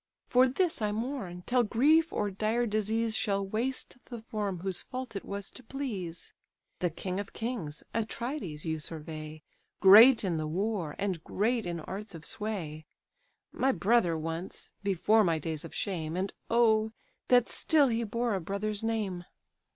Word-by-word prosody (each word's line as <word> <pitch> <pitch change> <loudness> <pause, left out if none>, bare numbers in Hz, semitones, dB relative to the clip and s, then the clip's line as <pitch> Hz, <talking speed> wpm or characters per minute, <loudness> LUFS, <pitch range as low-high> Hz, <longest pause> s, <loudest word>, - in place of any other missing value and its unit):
For 255 +1 +5
this 320 +2 0
I 210 -1 +1
mourn, 215 -6 -4
till 250 0 +3
grief 290 +9 +4
or 205 -1 -1
dire 220 +5 0
disease 220 +1 0
Shall 200 -2 0
waste 245 +5 -2
the 240 - -7
form 210 -5 -3
whose 185 -1 -1
fault 255 -3 -6
it 195 - -4
was 200 0 -4
to - - -12
please! 220 -11 -4 0.5
The 175 - +1
king 185 +4 -4
of 205 - -6
kings, 220 -11 -4
Atrides, 225 - -3
you 160 -1 -1
survey, 155 0 -6 0.4
Great 220 +6 +9
in 180 -4 0
the 155 -1 -2
war, 185 -2 -2
and 190 -5 -2
great 225 +1 0
in 170 -1 -3
arts 200 +4 -6
of 165 0 -8
sway: 170 -8 -3 0.6
My 270 - +2
brother 185 -4 +2
once, 165 +3 -5
before 205 +3 +3
my 165 -4 +2
days 155 0 -4
of 165 - -9
shame! 170 -4 -2
And 190 +2 -2 0.2
oh! 220 -2 +3 0.3
that 245 -1 +5
still 295 -4 +3
he 230 0 0
bore 230 +1 -1
a 190 - -1
brother's 200 +4 -3
name!" 210 -6 -2
205 Hz, 160 wpm, -30 LUFS, 175-230 Hz, 0.6 s, Great